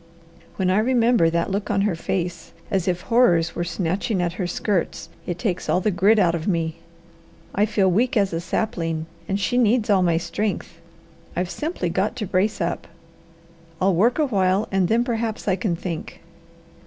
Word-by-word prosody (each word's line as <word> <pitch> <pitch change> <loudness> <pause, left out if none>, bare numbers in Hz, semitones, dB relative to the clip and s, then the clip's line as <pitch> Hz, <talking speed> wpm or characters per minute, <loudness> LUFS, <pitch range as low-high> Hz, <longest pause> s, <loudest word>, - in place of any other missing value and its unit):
When 185 -1 +1
I 190 - +3
remember 235 -6 +3
that 170 +3 -1
look 200 +2 -2
on 200 -2 +2
her 205 -2 +1
face, 170 0 -3 0.2
as 190 -3 0
if 180 -1 0
horrors 175 -10 +3
were 175 - -1
snatching 185 +3 -1
at 175 -1 0
her 180 - 0
skirts, 185 0 -2 0.2
it 175 - -2
takes 180 -1 -2
all - - +3
the 210 +3 +1
grit 200 +5 +4
out 180 -5 +4
of 165 -1 -3
me. 165 -4 0 0.8
I 210 +2 +2
feel 200 -3 +2
weak 225 +7 +2
as 200 -3 +2
a 165 - -1
sapling. 165 -4 -2 0.2
And 195 0 -1
she 245 +5 +1
needs 230 -2 +3
all 195 -2 +4
my 170 -2 +2
strength. 175 -2 -3 0.5
I've 180 +1 -1
simply 305 - -2
got 190 +7 0
to 230 -4 -3
brace 200 +4 0
up. 170 -2 -2 0.9
I'll 190 +1 +3
work 225 +8 +3
a 310 - +3
while 195 -3 +1
and 190 -2 +2
then 230 +5 +2
perhaps 230 -3 -3
I 190 - +3
can 185 -2 -1
think." 165 -1 -6
190 Hz, 185 wpm, -23 LUFS, 175-215 Hz, 0.9 s, grit